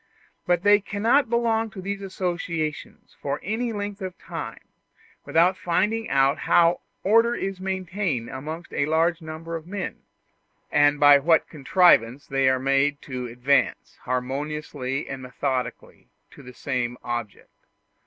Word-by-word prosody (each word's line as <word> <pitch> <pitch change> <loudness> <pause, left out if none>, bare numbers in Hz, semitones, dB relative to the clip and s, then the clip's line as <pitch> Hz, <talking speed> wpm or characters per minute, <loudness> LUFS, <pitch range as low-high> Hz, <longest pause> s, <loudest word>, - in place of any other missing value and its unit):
But 175 0 +2
they 205 0 +6
cannot 225 +6 +1
belong 225 -1 +1
to 195 - -10
these 200 +1 -4
associations 175 -5 -4
for 140 0 -2
any 225 +4 -2
length 205 -1 -5
of 185 -1 -5
time - - -8 0.6
without 175 +3 +3
finding 190 +5 0
out 140 +3 +3
how 170 0 +3 0.2
order 230 +4 +4
is 195 -3 -4
maintained 185 - -2
amongst 155 +7 -7
a 145 - 0
large 165 +2 +1
number 160 +1 -6
of 165 0 -7
men, 200 +1 -5 0.7
and 145 0 +4
by 145 -1 +8
what 160 +2 +3
contrivance 145 -5 +3
they 135 -1 +2
are 130 - +2
made 135 +2 +1
to 125 -2 -5
advance, 130 +3 0
harmoniously 135 +1 -3
and 135 -1 -6
methodically, 125 0 -4 0.2
to - - -14
the 125 -2 -12
same 125 -3 -2
object. 120 -3 -5
160 Hz, 135 wpm, -24 LUFS, 135-190 Hz, 0.7 s, by